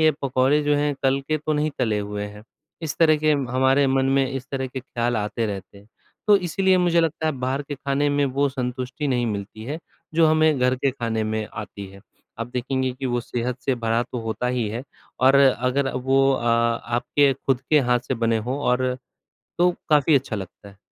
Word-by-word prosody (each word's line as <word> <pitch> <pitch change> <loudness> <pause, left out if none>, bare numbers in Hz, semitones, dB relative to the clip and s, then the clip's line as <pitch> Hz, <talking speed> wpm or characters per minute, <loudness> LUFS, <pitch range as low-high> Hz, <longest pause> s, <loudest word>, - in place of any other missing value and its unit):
ये 155 0 +6
पकौड़े 135 +3 +2
जो 145 0 +2
हैं, 145 0 0
कल 135 +1 +2
के 155 - +1
तो 155 +1 -2
नहीं 150 +1 0
तले 110 -4 +1
हुए 105 0 -4
हैं। 105 +1 -11 0.4
इस 155 - -3
तरह 155 -2 +5
के 155 0 +2
हमारे 130 +1 +2
मन 135 0 +2
में 135 0 +2
इस 135 -1 -5
तरह 135 -1 -2
के 130 +1 -6
ख्याल 120 -2 -2
आते 105 +2 -2
रहते 100 -1 -7
हैं। 100 - -19 0.4
तो 210 -1 +7
इसीलिए 185 +1 +2
मुझे 175 -1 +3
लगता 160 -1 -1
है 155 - +1
बाहर 130 +2 -2
के 145 +1 -6
खाने 140 +1 0
में 145 0 +2
वो 140 +1 +1
संतुष्टि 130 +2 -4
नहीं 125 -2 +1
मिलती 105 +1 -5
है, 150 +6 -4 0.4
जो 165 -1 +5
हमें 155 -2 +3
घर 125 0 +2
के 135 +1 +1
खाने 115 -3 -2
में 110 0 -2
आती 100 -2 -7
है। 100 - -14 0.4
आप 115 - -3
देखेंगे 130 +1 -1
कि 130 +1 -5
वो 120 -1 0
सेहत 120 +1 -3
से 135 - +2
भरा 115 0 0
तो 125 - -2
होता 115 +2 -3
ही 125 -4 0
है 115 +4 -4 0.4
और 135 +1 +5
अगर 135 0 +2
वो 135 +1 +3
अ, 120 - -2
आपके 120 +4 +2
खुद 135 -1 -1
के 155 - +6
हाथ 125 -1 +2
से 130 - +1
बने 115 -1 +1
हो 135 +3 -1
और 125 0 +1 0.6
तो 180 +1 +4 0.2
काफ़ी 150 0 +4
अच्छा 130 -5 0
लगता 100 +1 -9
है। 100 - -19
130 Hz, 210 wpm, -23 LUFS, 120-145 Hz, 0.6 s, तो